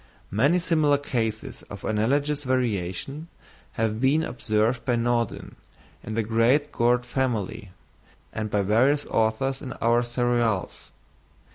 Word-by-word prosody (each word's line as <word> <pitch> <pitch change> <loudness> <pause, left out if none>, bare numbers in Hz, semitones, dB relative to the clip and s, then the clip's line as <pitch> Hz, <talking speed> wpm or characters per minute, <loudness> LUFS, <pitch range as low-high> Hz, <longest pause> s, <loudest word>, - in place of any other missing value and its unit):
Many 140 - +3
similar 155 -5 +2
cases 115 -6 -3
of 100 0 -8
analogous 140 +7 0
variation 125 - -2 0.5
have 110 0 -1
been 145 +5 +3
observed 115 -2 0
by 125 - +1
Naudin 115 -2 -1 0.5
in 110 - -5
the 115 - +1
great 120 +7 +2
gourd 120 +1 +2
family, 115 -5 -2 0.6
and 110 -1 -3
by 100 0 +1
various 130 +9 +3
authors 115 +5 0
in 130 -4 -6
our 120 +1 +2
cereals. 120 -4 -1
120 Hz, 120 wpm, -25 LUFS, 110-135 Hz, 0.6 s, Many